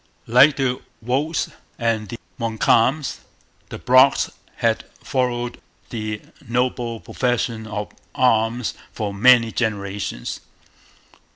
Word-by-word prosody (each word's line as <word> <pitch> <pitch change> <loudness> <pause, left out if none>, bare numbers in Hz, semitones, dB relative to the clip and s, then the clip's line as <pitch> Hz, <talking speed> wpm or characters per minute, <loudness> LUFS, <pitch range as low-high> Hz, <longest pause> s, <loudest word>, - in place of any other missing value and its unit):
Like 130 +6 +6
the 130 -2 -1 0.2
Wolfes 140 +8 -1 0.3
and 115 -3 -1
the 120 - -6 0.2
Montcalms, 115 +5 +2 0.5
the - - -6
Brocks 130 +2 +4 0.2
had - - +1 0.2
followed 120 -2 -1 0.3
the 110 -2 -4 0.2
noble 120 -1 -1
profession 120 -3 -1
of 105 -1 -4 0.2
arms 115 -1 +2 0.2
for 105 -2 -3
many 115 +2 +5
generations. 100 - -3
120 Hz, 95 wpm, -22 LUFS, 110-125 Hz, 0.5 s, Like